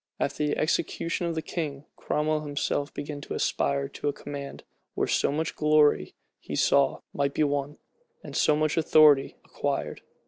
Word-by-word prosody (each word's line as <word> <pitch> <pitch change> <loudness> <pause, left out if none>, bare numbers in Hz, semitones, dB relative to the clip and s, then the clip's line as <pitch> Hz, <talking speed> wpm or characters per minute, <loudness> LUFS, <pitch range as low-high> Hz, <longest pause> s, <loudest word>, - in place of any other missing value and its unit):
After 150 - -1
the 145 - -1
execution 170 +2 -1
of 165 - -2
the 160 - -3
king, 150 -4 -4
Cromwell 155 0 -1
himself 145 0 -2
began 145 0 -6
to - - -6
aspire 140 0 0
to 145 - -5
a 145 - +1
command, 140 -1 -8 0.3
where - - +1
so - - +1
much 155 +2 -2
glory, 150 - +3 0.2
he - - -6
saw, 140 -1 +3
might 140 -1 -1
be 155 - +2
won, 145 0 -1 0.5
and - - -9
so 150 - +3
much 155 +1 0
authority 150 -3 +5
acquired. - - -3
150 Hz, 165 wpm, -27 LUFS, 140-155 Hz, 0.5 s, authority